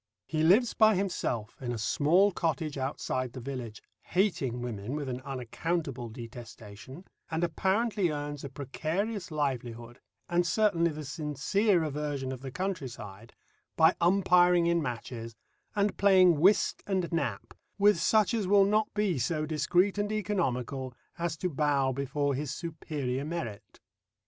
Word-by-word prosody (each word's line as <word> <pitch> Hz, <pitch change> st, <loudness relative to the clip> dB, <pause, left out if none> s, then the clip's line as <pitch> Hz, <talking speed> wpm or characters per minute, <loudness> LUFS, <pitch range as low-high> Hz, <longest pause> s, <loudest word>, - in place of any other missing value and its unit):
He 155 Hz, -1 st, -2 dB
lives 205 Hz, +10 st, +4 dB
by 215 Hz, -1 st, +5 dB
himself 135 Hz, -, -2 dB
in 125 Hz, -2 st, -3 dB
a 120 Hz, -, -3 dB
small 170 Hz, -, +3 dB
cottage 160 Hz, -3 st, -2 dB
outside 130 Hz, -2 st, -3 dB
the 130 Hz, -, -7 dB
village 125 Hz, -4 st, -6 dB, 0.2 s
hating 170 Hz, -, 0 dB
women 120 Hz, +1 st, -4 dB
with 145 Hz, -2 st, -3 dB
an 125 Hz, 0 st, -4 dB
unaccountable 135 Hz, +1 st, -3 dB
detestation 115 Hz, -, -10 dB, 0.2 s
and 165 Hz, +1 st, -1 dB
apparently 190 Hz, +3 st, +1 dB
earns 145 Hz, -1 st, -4 dB
a 140 Hz, -, -5 dB
precarious 170 Hz, -, -3 dB
livelihood, 120 Hz, -6 st, -3 dB, 0.3 s
and 175 Hz, 0 st, +2 dB
certainly 170 Hz, -2 st, +2 dB
the 155 Hz, -1 st, -6 dB
sincere 160 Hz, +6 st, +1 dB
aversion 145 Hz, -3 st, -3 dB
of 130 Hz, -2 st, -6 dB
the 135 Hz, -, -6 dB
country 180 Hz, -1 st, -3 dB
side, 110 Hz, -1 st, -11 dB, 0.4 s
by 160 Hz, +2 st, +5 dB
umpiring 180 Hz, -1 st, +4 dB
in 170 Hz, 0 st, +2 dB
matches, 115 Hz, -3 st, -5 dB, 0.4 s
and 205 Hz, -1 st, +1 dB
playing 185 Hz, -5 st, +5 dB
whist 195 Hz, +5 st, +3 dB
and 190 Hz, -3 st, -1 dB
"Nap" 165 Hz, 0 st, -2 dB, 0.2 s
with 205 Hz, -3 st, +4 dB
such 215 Hz, +5 st, +3 dB
as 215 Hz, -5 st, 0 dB
will 200 Hz, 0 st, +6 dB
not 215 Hz, +1 st, +1 dB
be 200 Hz, -8 st, +1 dB
so 155 Hz, +5 st, 0 dB
discreet 175 Hz, +6 st, +1 dB
and 205 Hz, +1 st, -1 dB
economical 135 Hz, -, -2 dB, 0.2 s
as 170 Hz, -2 st, -2 dB
to 180 Hz, -, -1 dB
bow 145 Hz, -4 st, +1 dB
before 140 Hz, +2 st, -1 dB
his 140 Hz, +2 st, -3 dB
superior 145 Hz, -4 st, -4 dB
merit. 120 Hz, -11 st, -6 dB
155 Hz, 145 wpm, -29 LUFS, 130-185 Hz, 0.4 s, will